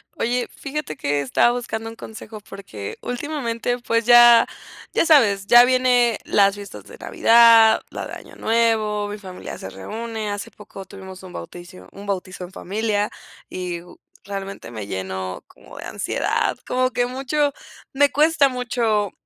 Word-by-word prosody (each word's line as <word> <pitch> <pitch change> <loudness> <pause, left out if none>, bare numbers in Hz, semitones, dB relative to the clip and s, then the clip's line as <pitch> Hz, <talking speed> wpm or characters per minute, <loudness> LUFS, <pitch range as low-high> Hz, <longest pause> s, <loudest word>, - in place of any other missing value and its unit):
Oye, 245 +1 -1
fíjate 280 - -6
que 145 0 -1
estaba 140 - +3
buscando 225 -2 -4
un 225 - -10
consejo 220 -1 -10
porque 195 - -9
últimamente, 245 -3 -3
pues 230 -1 0
ya 240 -1 +8 0.5
ya - - +2
sabes, 220 -12 +4
ya 240 +3 +8
viene 245 -3 +3
las 200 -1 +3
fiestas 200 - -10
de - - -13
Navidad, 230 -1 +5
la - - -5
de - - -10
Año - - -11
Nuevo, 220 -2 +1
mi 210 +1 -6
familia 185 -2 -9
se 95 - -7
reúne. 220 - -5
Hace 205 0 -5
poco 195 -2 -12
tuvimos 190 -1 -11
un 185 - -11
bautizo 175 - -10
un 200 - -11
bautizo 185 -2 -4
en 180 - -14
familia 205 +2 -2 0.4
y 180 -2 -5 0.4
realmente 195 -7 -7
me 110 -4 -7
llenó 95 -1 -5
como - - -16
de - - -8
ansiedad, - - -1
como 255 0 +1
que 245 -1 0
mucho 275 +3 -1 0.4
me 285 +1 +4
cuesta 300 -1 +3
mucho 235 -5 -1
220 Hz, 155 wpm, -21 LUFS, 190-245 Hz, 0.5 s, ya